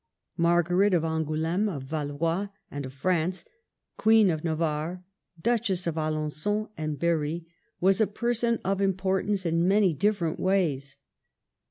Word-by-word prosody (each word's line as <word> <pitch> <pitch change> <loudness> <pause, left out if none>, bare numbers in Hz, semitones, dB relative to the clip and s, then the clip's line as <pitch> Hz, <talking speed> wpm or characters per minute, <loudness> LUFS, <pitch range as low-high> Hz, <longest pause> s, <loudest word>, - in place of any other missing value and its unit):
Margaret 175 +3 +3
of 165 - +1
Angouleme, 160 +5 0
of 145 -8 -5
Valois, 155 +6 -2 0.2
and 145 -2 -5
of 130 - -11
France, 180 +4 -1 0.5
Queen 220 -3 +5
of 155 -2 -3
Navarre, 160 +2 -2 0.4
Duchess 200 -3 0
of 170 - 0
Alengon 155 +7 -2
and 155 -1 -3
Berry, 165 0 0 0.3
was 195 +4 +3
a 215 - +4
person 235 +1 0
of 195 +1 0
importance 190 0 0
in 165 +1 +2
many 195 -2 +4
different 170 0 0
ways. 150 -8 0
170 Hz, 130 wpm, -27 LUFS, 155-195 Hz, 0.5 s, Queen